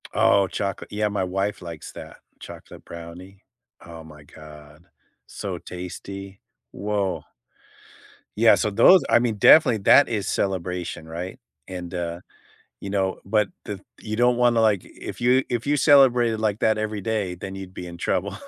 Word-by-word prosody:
Oh, 100 Hz, -1 st, +3 dB
chocolate. 100 Hz, +2 st, -4 dB
Yeah. 105 Hz, 0 st, 0 dB
My 100 Hz, -2 st, -2 dB
wife 95 Hz, +3 st, -2 dB
likes 85 Hz, -3 st, -9 dB
that. -, -, -11 dB, 0.2 s
Chocolate -, -, -12 dB
brownie. 90 Hz, +4 st, -11 dB, 0.4 s
Oh 85 Hz, -1 st, -10 dB
my 75 Hz, -1 st, -14 dB
god. 75 Hz, +1 st, -15 dB, 0.4 s
So -, -, -6 dB
tasty. 95 Hz, +2 st, -9 dB, 0.3 s
Woah. 100 Hz, -2 st, -2 dB, 1.1 s
Yeah. 115 Hz, +1 st, +6 dB
So 105 Hz, -, 0 dB
those 180 Hz, -, +6 dB
I -, -, +5 dB
mean, 120 Hz, -2 st, -1 dB
definitely, 115 Hz, +2 st, +6 dB
that 140 Hz, +8 st, +6 dB
is 110 Hz, -4 st, -3 dB
celebration. 90 Hz, -4 st, -3 dB
Right? 90 Hz, +8 st, -7 dB, 0.3 s
And, 90 Hz, -2 st, -7 dB
uh, 85 Hz, -1 st, -4 dB, 0.6 s
you 100 Hz, -, -6 dB
know 95 Hz, -1 st, -1 dB
but 105 Hz, +1 st, +1 dB, 0.2 s
the 100 Hz, -2 st, -6 dB, 0.2 s
you 110 Hz, 0 st, -5 dB
don't 120 Hz, +1 st, +3 dB
wanna, 120 Hz, -1 st, +3 dB
like 105 Hz, -4 st, +2 dB
if -, -, -10 dB
you 125 Hz, +2 st, +3 dB
if 120 Hz, +2 st, -3 dB
you 145 Hz, -, +3 dB
celebrated 125 Hz, -6 st, +4 dB
like 105 Hz, -2 st, 0 dB
that 110 Hz, -1 st, +1 dB
every 110 Hz, -1 st, -3 dB
day, 100 Hz, -4 st, -2 dB
then 95 Hz, +2 st, -7 dB
you'd 95 Hz, -1 st, -9 dB
be 90 Hz, -, -8 dB
in 85 Hz, 0 st, -9 dB
trouble. -, -, -2 dB
100 Hz, 160 wpm, -23 LUFS, 90-110 Hz, 1.1 s, Yeah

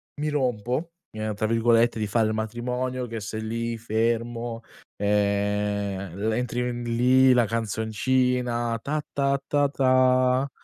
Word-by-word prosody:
"mi 150 Hz, +1 st, -2 dB
rompo", 130 Hz, +3 st, -1 dB, 0.2 s
ehm, 110 Hz, -1 st, -4 dB
tra 110 Hz, -, -1 dB
virgolette 115 Hz, 0 st, +3 dB
di 105 Hz, -, -1 dB
fare 110 Hz, +2 st, +2 dB
il -, -, -1 dB
matrimonio 125 Hz, +3 st, -3 dB
che 115 Hz, -1 st, -5 dB
sei 110 Hz, +1 st, -5 dB
lì, 115 Hz, +1 st, -3 dB
fermo, 115 Hz, +1 st, -2 dB, 0.4 s
ehm, 100 Hz, -2 st, 0 dB
le 110 Hz, +2 st, -1 dB
entri 125 Hz, 0 st, -2 dB
n 120 Hz, 0 st, -5 dB
lì 125 Hz, +3 st, +4 dB
la 120 Hz, -2 st, +4 dB
canzoncina 115 Hz, +2 st, 0 dB
"Ta 150 Hz, +3 st, -2 dB
ta 140 Hz, 0 st, +1 dB
ta 145 Hz, -1 st, +2 dB
ta" 130 Hz, 0 st, +3 dB
115 Hz, 135 wpm, -25 LUFS, 110-125 Hz, 0.4 s, lì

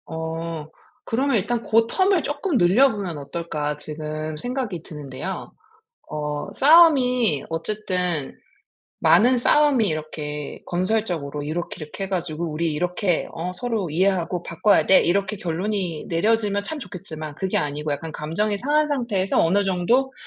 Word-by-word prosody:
어. 160 Hz, -1 st, -5 dB, 0.4 s
그러면 265 Hz, +3 st, 0 dB
일단 230 Hz, +4 st, -1 dB
'고 225 Hz, +1 st, +3 dB
텀을 375 Hz, -, +2 dB
조금 290 Hz, +1 st, -1 dB
늘려보면 195 Hz, -, +3 dB
어떨까?' 150 Hz, 0 st, -3 dB
지금 155 Hz, 0 st, -5 dB
생각이 245 Hz, -, -3 dB
드는데요. 150 Hz, +4 st, -6 dB, 0.6 s
어 150 Hz, -1 st, -3 dB
싸움이 255 Hz, -, +5 dB
어쨌든 180 Hz, -3 st, -2 dB, 0.6 s
많은 250 Hz, +3 st, +5 dB
싸움이 275 Hz, -1 st, +4 dB
이렇게 150 Hz, -2 st, -4 dB
건설적으로 175 Hz, -6 st, -1 dB
이렇게 165 Hz, +4 st, -4 dB
이렇게 155 Hz, +6 st, -6 dB
해 -, -, -10 dB
가지고 170 Hz, -3 st, -2 dB
"우리 160 Hz, +2 st, -1 dB
이렇게 180 Hz, +3 st, 0 dB
어 170 Hz, +2 st, -4 dB
서로 220 Hz, -3 st, -2 dB
이해하고 180 Hz, +1 st, 0 dB
바꿔야 200 Hz, +5 st, +2 dB
돼." 190 Hz, -, +7 dB
이렇게 195 Hz, +3 st, +1 dB
결론이 180 Hz, -2 st, -2 dB
내려지면 205 Hz, +3 st, +1 dB
참 310 Hz, +8 st, -5 dB
좋겠지만 155 Hz, -, -7 dB
그게 190 Hz, +3 st, -1 dB
아니고 150 Hz, +1 st, -2 dB
약간 160 Hz, +3 st, -4 dB
감정이 200 Hz, +8 st, -1 dB
상한 295 Hz, +6 st, +2 dB
상태에서 235 Hz, -9 st, +1 dB
어느 190 Hz, +5 st, +3 dB
정도 215 Hz, +9 st, +1 dB
180 Hz, 320 characters per minute, -23 LUFS, 155-225 Hz, 0.6 s, 돼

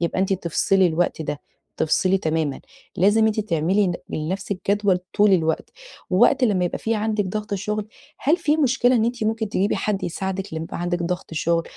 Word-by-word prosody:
يبقى 170 Hz, +2 st, 0 dB
أنتِ 195 Hz, 0 st, +1 dB
تفصِلي 190 Hz, +1 st, +2 dB
الوقت 165 Hz, -1 st, 0 dB
ده، 145 Hz, -1 st, -4 dB, 0.4 s
تفصِلي 185 Hz, +4 st, +2 dB
تمامًا، 155 Hz, -4 st, -1 dB, 0.4 s
لازم 205 Hz, +5 st, +4 dB
أنتِ 220 Hz, 0 st, +1 dB
تعملي 190 Hz, +1 st, +1 dB
ل 175 Hz, -, -1 dB, 0.2 s
لنفسِك 185 Hz, +4 st, -3 dB
جدول 200 Hz, -3 st, +2 dB, 0.2 s
طول 205 Hz, -1 st, +4 dB
الوقت، 160 Hz, -3 st, +1 dB, 0.4 s
ووقت 240 Hz, +7 st, +4 dB
لمّا 195 Hz, -5 st, +2 dB
يبقى -, -, -4 dB
في 225 Hz, 0 st, -1 dB
عندِك 215 Hz, -1 st, 0 dB
ضغط 210 Hz, +2 st, -4 dB
الشغل. 210 Hz, +2 st, -2 dB, 0.3 s
هل 310 Hz, +5 st, +2 dB
في 310 Hz, -3 st, +1 dB
مشكلة 255 Hz, -3 st, +3 dB
إن 220 Hz, -, +2 dB
أنتِ 235 Hz, -1 st, -2 dB
ممكن 220 Hz, -1 st, -1 dB
تجيبي 200 Hz, +1 st, 0 dB
حد 205 Hz, -2 st, -1 dB
يساعدِك 190 Hz, +1 st, -4 dB
لما 160 Hz, -, -3 dB
يبقى 165 Hz, -, -6 dB
عندِك 175 Hz, 0 st, -1 dB
ضغط 175 Hz, -1 st, -4 dB
شُغل 165 Hz, +2 st, +1 dB
195 Hz, 185 wpm, -22 LUFS, 175-215 Hz, 0.4 s, لازم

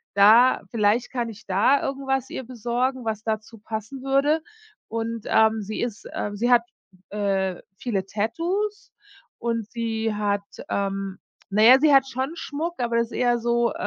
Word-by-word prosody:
da 225 Hz, +6 st, +6 dB
vielleicht 230 Hz, +2 st, +1 dB
kann 240 Hz, -3 st, -2 dB
ich 215 Hz, 0 st, -12 dB
da 205 Hz, +9 st, +3 dB
irgendwas 270 Hz, -1 st, -2 dB
ihr 260 Hz, -, -5 dB
besorgen, 245 Hz, +1 st, -2 dB
was 215 Hz, -1 st, -2 dB
dazu 220 Hz, 0 st, -4 dB
passen 220 Hz, +5 st, -6 dB
würde. 280 Hz, +4 st, +2 dB, 0.5 s
Und, 230 Hz, 0 st, -4 dB
ähm, 220 Hz, 0 st, +3 dB
sie 210 Hz, +1 st, -5 dB
ist, 235 Hz, -3 st, -4 dB
ähm 205 Hz, 0 st, -3 dB
sie 240 Hz, +4 st, 0 dB
hat, 235 Hz, -1 st, +6 dB, 0.5 s
äh, 195 Hz, -3 st, -1 dB, 0.2 s
viele 205 Hz, -6 st, -2 dB
Tattoos 345 Hz, -, -2 dB, 0.5 s
und 230 Hz, -2 st, -2 dB
sie 225 Hz, -2 st, -2 dB
hat, 205 Hz, -1 st, 0 dB, 0.3 s
ähm, 195 Hz, -1 st, -2 dB, 0.3 s
na 205 Hz, +2 st, +1 dB
ja, 255 Hz, +3 st, +9 dB
sie 300 Hz, -1 st, +4 dB
hat 270 Hz, 0 st, +6 dB
schon 260 Hz, +3 st, -3 dB
Schmuck, 325 Hz, +1 st, -4 dB
aber 235 Hz, -1 st, 0 dB
das 235 Hz, 0 st, +1 dB
ist -, -, -22 dB
eher, 245 Hz, -1 st, +2 dB
ähm, 240 Hz, -, 0 dB
so 235 Hz, 0 st, +1 dB
230 Hz, 165 wpm, -24 LUFS, 210-260 Hz, 0.5 s, ja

